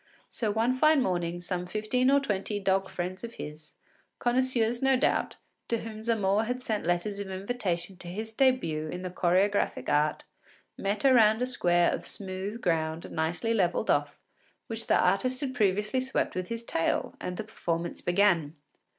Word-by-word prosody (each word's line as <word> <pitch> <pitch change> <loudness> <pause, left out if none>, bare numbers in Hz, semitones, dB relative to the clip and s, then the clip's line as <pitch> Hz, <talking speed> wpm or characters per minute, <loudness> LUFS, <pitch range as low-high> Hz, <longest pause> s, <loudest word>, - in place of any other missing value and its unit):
So 225 -4 -2
one 225 +4 +2
fine 305 +3 +5
morning 175 -2 -1
some 180 0 -3
fifteen 215 +6 +1
or 280 +1 +5
twenty 205 -5 -2
dog 195 0 +1
friends 185 +3 -5
of 235 0 -7
his, 150 +1 -9 0.4
connoisseurs 245 -1 +1
no 270 -1 +4
doubt, 265 - +1 0.3
to 230 -1 -1
whom 215 -1 -7
Zamore 215 -2 +1
had 250 +2 -2
sent 215 -7 -2
letters 175 +4 0
of 200 -1 -5
invitation 190 -3 -3
to 175 - -9
his 220 +5 -5
début 170 - +1
in 180 +1 -5
the 185 - -4
choregraphic 185 +3 +1
art, 150 +1 +1 0.5
met 200 +5 -2
around 230 -3 +5
a - - +2
square 175 -8 +3
of - - -4
smooth 195 +3 -3
ground 160 -2 -1
nicely 170 +8 -1
levelled 180 -6 +1
off, 145 0 0 0.5
which 225 0 -4
the - - +4
artist 255 +6 +2
had 270 -2 -2
previously 210 +2 +1
swept 260 +1 -1
with 185 0 -3
his 230 0 -4
tail, 165 -7 -1
and 180 0 -4
the - - -3
performance 170 -5 -3
began. 175 -5 +2
200 Hz, 170 wpm, -28 LUFS, 175-230 Hz, 0.5 s, fine